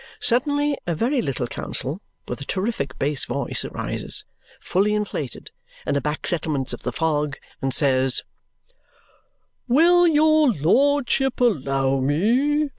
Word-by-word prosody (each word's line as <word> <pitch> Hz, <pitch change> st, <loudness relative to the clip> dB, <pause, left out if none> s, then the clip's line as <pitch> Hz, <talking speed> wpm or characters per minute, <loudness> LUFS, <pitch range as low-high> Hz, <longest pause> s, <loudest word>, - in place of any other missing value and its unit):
Suddenly 290 Hz, +4 st, +2 dB
a 170 Hz, -, 0 dB
very 245 Hz, -, 0 dB
little 135 Hz, -, -2 dB
counsel 140 Hz, -, -4 dB, 0.3 s
with -, -, -5 dB
a -, -, -3 dB
terrific 185 Hz, -, -3 dB
bass 145 Hz, 0 st, -1 dB
voice -, -, -1 dB
arises, -, -, -2 dB, 0.3 s
fully 205 Hz, +3 st, +1 dB
inflated, 180 Hz, -, -4 dB, 0.3 s
in -, -, 0 dB
the 140 Hz, -, 0 dB
back 150 Hz, +1 st, -3 dB
settlements 150 Hz, -6 st, 0 dB
of -, -, -7 dB
the 125 Hz, -, -3 dB
fog, 150 Hz, -1 st, -1 dB, 0.2 s
and 135 Hz, -, -1 dB
says, 130 Hz, -2 st, +2 dB, 1.4 s
"Will 345 Hz, +7 st, +5 dB
your 310 Hz, -1 st, +4 dB
lordship 270 Hz, -, +2 dB
allow 135 Hz, -, +1 dB
me? 245 Hz, -, +1 dB
185 Hz, 125 wpm, -22 LUFS, -, 1.4 s, Will